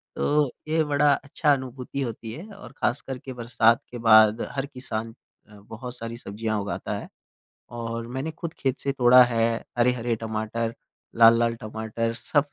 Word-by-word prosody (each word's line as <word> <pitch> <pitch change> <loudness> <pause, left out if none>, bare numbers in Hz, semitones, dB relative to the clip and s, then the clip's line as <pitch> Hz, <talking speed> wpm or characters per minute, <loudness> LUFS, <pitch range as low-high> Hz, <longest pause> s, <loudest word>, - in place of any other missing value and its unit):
तो 145 -3 +1 0.2
ये 160 +1 +2
बड़ा 145 -1 +3
अच्छा 145 +2 0
अनुभूति 130 +1 -5
होती 115 -3 -5
है। 170 - -8
और 125 - -12
ख़ासकर 130 +1 -2
के 130 +1 -8
बरसात 115 -1 +2
के 120 - -6
बाद 110 0 +7
हर 140 0 -2
किसान 115 -4 -5 0.4
अ, 105 - -15
बहुत 115 +4 -9
सारी 115 0 -6
सब्जियाँ 110 -1 -3
उगाता 100 - -4
है। - - -8 0.7
और 115 0 -4
मैंने 130 +6 -4
खुद 165 0 -7
खेत 135 0 -1
से 140 - -1
तोड़ा 125 -1 +7
है 115 -2 +1 0.3
हरे-हरे 120 -1 +2
टमाटर, 110 +1 -3 0.4
लाल-लाल 115 0 +6
टमाटर, 110 +1 -3
सब 145 +5 0
120 Hz, 160 wpm, -25 LUFS, 115-135 Hz, 0.7 s, बाद